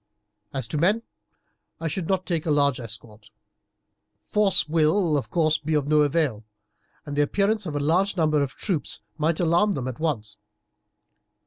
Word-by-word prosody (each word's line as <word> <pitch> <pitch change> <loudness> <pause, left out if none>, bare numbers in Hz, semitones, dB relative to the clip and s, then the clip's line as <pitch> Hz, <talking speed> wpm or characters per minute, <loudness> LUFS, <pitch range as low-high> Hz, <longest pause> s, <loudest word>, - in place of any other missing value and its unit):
As 130 -4 -2
to 150 - -2
men 205 +8 +2 0.8
I 165 - -2
should 165 +2 -3
not 190 -1 0
take 165 -3 -2
a - - +1
large 140 -3 +2
escort. 110 -2 -9 0.9
Force 205 -6 +2
will, 160 +2 +2
of 140 - -2
course, 155 -2 +2
be 155 +1 -1
of 145 -2 0
no 150 0 +4
avail, 145 -7 +1 0.6
and 145 -1 -5
the 145 - +3
appearance 200 +6 +1
of 150 - -4
a - - 0
large 180 +7 +1
number 155 -3 +2
of 140 -2 -2
troops 170 -10 -2 0.2
might 155 +1 +1
alarm 175 +4 +3
them 130 -7 -3
at 130 +1 -6
once. 110 -10 -2
155 Hz, 170 wpm, -25 LUFS, 145-175 Hz, 0.9 s, no